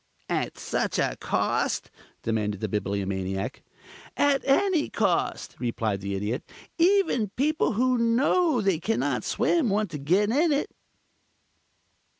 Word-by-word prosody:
"At - - -2
such - - -2
a - - 0
cost?" - - -1 0.3
demanded 105 -3 -1
the 110 - -2
Bibliomaniac. 95 -1 -2 0.6
"At 285 -1 +3
any 320 +3 +2
cost," 195 -6 -1
replied 110 -5 -2
the 100 0 -3
Idiot. 105 +6 -2 0.4
"Even 345 - +3
people 300 -1 +1
who 250 +3 +2
know 255 +5 +2
they 195 -5 +1
can 220 +6 -1
not - - -1
swim 325 -9 +1
want 205 -2 0
to 150 - -5
get 185 +9 +2
in 305 +6 +3
it." 285 0 0
210 Hz, 130 wpm, -26 LUFS, -, 0.6 s, At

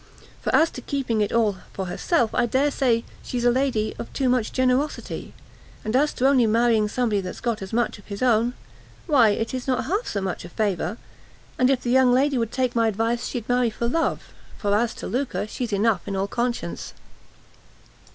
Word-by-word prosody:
For - - -2
as 325 +1 +4
to 255 - -8
keeping 245 -5 -1
it 205 - 0
all 220 -4 +2 0.2
for 190 - -3
herself, 230 - 0
I 240 - +2
dare 270 +5 +2
say 240 -4 +1 0.2
she's 245 -1 -3
a 245 - +6
lady 245 -4 0
of - - -6
too 265 -2 +1
much 245 -3 +1
generosity; 260 +3 -1 0.5
and 215 +3 -1
as 295 +3 +3
to 260 - +2
only 260 -4 +4
marrying 225 -1 +3
somebody 220 -4 0
that's 180 -1 -6
got 235 -4 -2
as 190 - -7
much 230 -2 0
of 205 - -18
his 200 +2 -4
own, 240 0 +3 0.5
why 265 -9 +5
it 225 +3 -1
is 255 0 -4
not 255 -1 0
half 410 +8 -1
so 200 - -2
much 190 -2 -3
a 175 - -9
favour; 210 +1 -1 0.6
and 255 - +4
if 270 -2 +2
the 240 - -1
young 260 -1 +5
lady 265 +1 +3
would 230 -1 -1
take 255 -2 -1
my 230 -1 +3
advice, 225 +3 0
she'd 235 -3 -5
marry 245 -1 +2
for 235 +2 -3
love, 325 +7 -1 0.2
for 205 -1 0
as 225 +2 +1
to - - -7
lucre, 255 -3 -2
she's 230 +2 -4
enough 205 -2 +1
in 195 - -3
all 195 +1 0
conscience." 240 +3 -3
235 Hz, 205 wpm, -24 LUFS, 215-255 Hz, 0.6 s, a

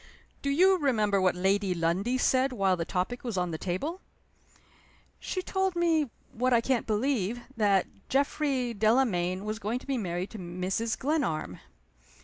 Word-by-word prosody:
"Do 280 - -1
you 370 +6 +4
remember 215 - +2
what 185 -1 +3
Lady 190 +1 +1
Lundie 180 +9 0
said 260 +1 +2
while 195 -6 +2
the 170 -2 -3
topic 185 +9 -2
was 235 -6 -3
on 180 -1 0
the 160 - -4
table?" 285 - -3 1.2
"She 370 - -3
told 380 -1 0
me, 325 -5 +2 0.2
what 250 +2 +1
I 235 - +6
can't 245 +1 0
believe, 230 0 0
that 200 -4 +3 0.2
Geoffrey 270 -3 0
Delamayn 205 -5 +1
was 215 +1 -3
going 225 +3 -2
to - - -10
be 270 -3 -1
married 180 -1 -3
to 220 - -8
Mrs. 185 +6 -2
Glenarm." 245 - -1
225 Hz, 155 wpm, -29 LUFS, 185-270 Hz, 1.2 s, I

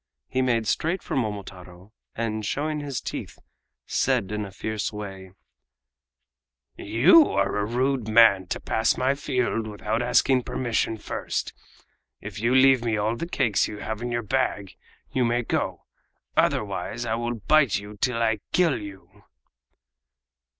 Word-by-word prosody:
He 130 - -1
made 120 -3 +1
straight 165 - -1
for - - -4
Momotaro, 100 -4 -5 0.2
and 110 -1 -2
showing 150 +8 -2
his 140 -4 -4
teeth, - - -6 0.5
said 125 -7 0
in 105 -1 -2
a 100 - -9
fierce 105 +1 -3
way: 95 -3 -8 1.4
"You 130 - +5
are 100 +1 0
a 105 - 0
rude 125 0 0
man 110 -4 +5
to - - -3
pass 110 +1 +1
my 130 +2 +2
field 125 -5 -1
without 105 +2 -2
asking 125 +1 +3
permission 115 -2 -1
first. 105 - -4 0.7
If - - -8
you 120 +4 +2
leave 130 -2 +6
me 115 -2 0
all 110 +2 0
the 170 +8 -5
cakes 120 - +1
you 105 - -7
have 110 +1 -5
in 120 0 -3
your 120 0 -1
bag 105 -5 -1 0.4
you 130 - +1
may 120 +1 +1
go; - - -2 0.5
otherwise 105 +3 0
I 110 - -1
will 120 +1 -2
bite 140 +1 +3
you 105 +2 -9
till 115 -2 +1
I 110 -2 +1
kill 165 -10 +2
you!" 100 -2 -12
115 Hz, 150 wpm, -25 LUFS, 105-130 Hz, 1.4 s, leave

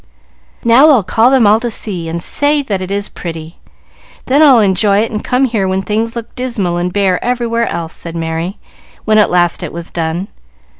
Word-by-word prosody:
"Now 245 +6 +6
I'll 255 -9 +4
call 225 +6 +3
them 260 -4 +3
all 210 +2 +5
to 240 0 -3
see, 180 -7 -4
and 170 +1 -3
say 290 0 +1
that 200 -7 -3
it 185 - -5
is 200 +1 -1
pretty. 165 -1 -8 0.7
Then 275 +4 +2
I'll 275 -6 +6
enjoy 200 0 +2
it, 225 - -2
and 215 -1 -4
come 255 +2 +1
here 220 -6 -1
when 190 +1 -1
things 220 +4 -2
look 235 -1 -7
dismal 225 -9 -2
and 175 +1 -2
bare 190 -2 0
everywhere 235 -1 -1
else," 165 -1 -4
said 170 0 -7
Merry, 165 +3 -3 0.5
when 215 0 +3
at 210 - +3
last 175 -1 +1
it - - -5
was 170 0 -8
done. 170 +3 -3
205 Hz, 200 wpm, -14 LUFS, 175-235 Hz, 0.7 s, Now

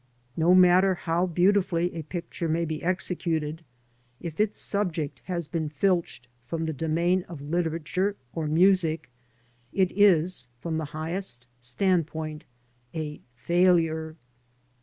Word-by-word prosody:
No 170 +3 +4
matter 185 +1 +6
how 170 +2 0
beautifully 180 -1 +2
a 165 - -4
picture 170 +1 -5
may 165 +2 +1
be 155 -1 -4
executed, 170 -3 -1 0.6
if 170 -1 -7
its 215 0 +1
subject 175 -8 -2
has 170 -4 -3
been 160 -1 -2
filched 170 -4 0 0.2
from 165 +4 -2
the 160 - -2
domain 170 +5 +1
of 165 -4 -7
literature 170 +5 -1 0.2
or 160 -2 -2
music, 165 -3 +3 0.6
it 190 -2 +2
is, 185 -8 +3
from 160 +3 -2
the 160 - -3
highest 155 -3 -4
standpoint, 155 +3 -1 0.5
a 150 -2 -4
failure. 160 +2 +2
165 Hz, 120 wpm, -27 LUFS, 155-180 Hz, 0.6 s, matter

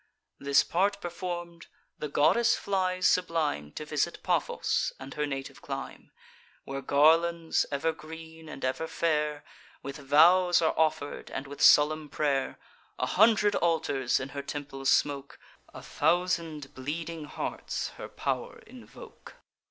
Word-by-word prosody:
This 140 0 +3
part 200 +3 0
perform'd, 175 -1 -6 0.3
the 150 - -3
goddess 235 +12 +3
flies 185 -2 -1
sublime 160 - +1
To - - -6
visit - - -2
Paphos - - 0
and 135 0 -8
her 150 0 -2
native 135 -1 -6
clime; - - -7 0.5
Where 135 0 -5
garlands, 165 +4 +3
ever 140 +3 0
green 160 0 -11
and 135 - -5
ever 130 +5 -2
fair, 150 -2 -1 0.4
With 140 0 -6
vows 170 +6 +5
are 160 -2 +2
offer'd, 155 -2 -1
and 135 - -5
with 140 0 -9
solemn 150 0 +5
pray'r: 140 -2 -1 0.4
A - - 0
hundred 210 0 +4
altars 145 -6 +1
in 130 - -5
her 140 +1 -5
temple 140 -1 -7
smoke; 140 0 +1 0.3
A - - -11
thousand 170 -5 -1
bleeding 155 +4 -5
hearts - - -4
her - - -6
pow'r 480 0 -3
invoke. 435 - -14
155 Hz, 130 wpm, -28 LUFS, 140-175 Hz, 0.5 s, vows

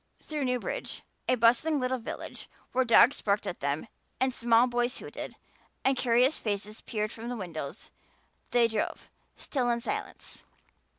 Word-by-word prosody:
Through 300 -3 -3
Newbridge, 250 -1 -2 0.3
a 255 - +5
bustling 250 +6 +4
little 255 0 0
village 225 - -7 0.2
where 260 +1 +3
dogs 235 +2 +6
barked 205 0 +1
at 175 - -4
them 140 +7 -1 0.3
and 260 -1 +2
small 235 0 +4
boys 240 0 0
hooted - - -7 0.5
and 265 0 +4
curious 250 +3 +3
faces 210 0 -3
peered 215 -1 -2
from 230 +1 -6
the 245 - -3
windows, 170 -3 -6 0.6
they 240 -1 +5
drove, 220 -2 -3 0.3
still 255 -4 -1
in 235 0 +2
silence. 415 - -5
240 Hz, 145 wpm, -29 LUFS, 215-255 Hz, 0.6 s, dogs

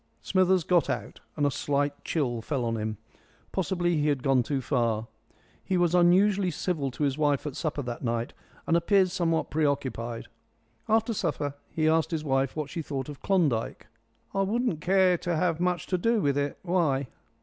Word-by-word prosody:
Smithers 185 -1 +3
got 175 +1 +2
out, - - -4 0.2
and 145 - +2
a 145 - +2
slight 145 +1 -1
chill 125 -8 -1
fell 130 0 -2
on 115 0 -1
him. 110 -1 -3 0.5
Possibly 175 -3 0
he 150 0 +1
had 140 -3 0
gone 135 -3 +3
too 135 +3 -1
far. 115 -5 0 0.6
He 185 - 0
was 175 -1 +2
unusually 185 +2 +4
civil 155 -4 -2
to 130 - -4
his 140 0 0
wife 145 -2 +1
at 145 -3 -4
supper 150 -2 -2
that 120 0 -6
night, 115 0 -2 0.3
and 165 - +2
appeared 185 +2 +3
somewhat 165 -2 0
preoccupied. 130 -6 -1 0.6
After 225 +1 +2
supper 150 -7 -2 0.2
he 155 -1 0
asked 160 0 +3
his 160 -3 -2
wife 135 -2 0
what 155 -2 -4
she 165 - -3
thought 140 -3 -4
of 145 -2 -9
Klondike. 155 - 0 0.5
"I 195 - +1
wouldn't 205 -4 0
care 185 0 +3
to 175 -1 -1
have 165 0 +1
much 180 -1 0
to 185 - -1
do 230 +4 +2
with 140 -7 +1
it. 145 0 -1
Why?" 160 -7 +1
155 Hz, 185 wpm, -27 LUFS, 135-180 Hz, 0.6 s, unusually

